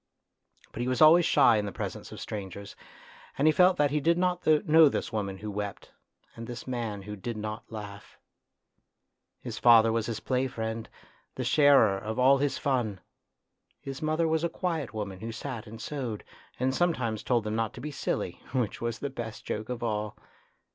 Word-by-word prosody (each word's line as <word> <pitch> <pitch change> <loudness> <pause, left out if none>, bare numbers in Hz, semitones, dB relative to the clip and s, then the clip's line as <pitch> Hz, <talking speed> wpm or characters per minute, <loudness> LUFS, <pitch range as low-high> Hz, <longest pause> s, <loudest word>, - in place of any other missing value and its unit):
But 120 - -5
he 120 - -1
was 130 -1 0
always 165 +2 +7
shy 120 -6 +5
in 105 -1 -1
the - - -4
presence - - -6
of - - -8
strangers, 100 -1 -7 0.6
and 145 - +3
he - - +7
felt 180 +4 +4
that 145 -1 +2
he 150 - +1
did 165 +3 +2
not 180 0 0
know 155 0 +6
this 120 - -3
woman 100 -3 -2
who 105 +2 -6
wept 100 -1 -5 0.4
and 115 0 -8
this 120 0 -7
man 115 -6 -4
who 105 +1 -7
did 110 +3 -5
not 110 +1 -6
laugh. 105 -2 -9 1.2
His - - -6
father 115 -2 +6
was 115 -1 -1
his 115 -2 -3
play 130 0 0
friend, 110 -2 -5 0.5
the - - -3
sharer 140 -10 +5
of 110 +3 -5
all 135 +2 +5
his 145 0 0
fun; 120 -8 -1 0.8
his 135 +2 -7
mother 155 +1 +1
was 160 0 +1
a 170 - +1
quiet 160 - -3
woman 100 -4 -5
who 115 +3 -5
sat 115 0 -6
and 110 +1 -10
sewed, 120 -4 -4 0.4
and 130 +1 +1
sometimes 130 -10 0
told 120 -3 +1
them 105 0 -3
not 115 -1 -1
to - - -9
be 150 +4 -5
silly, - - -3
which 125 -5 -1
was 115 -1 -2
the 140 +3 -4
best 115 -4 -7
joke 110 +2 -4
of 125 -1 -4
all. 105 -2 -2
120 Hz, 190 wpm, -28 LUFS, 110-145 Hz, 1.2 s, always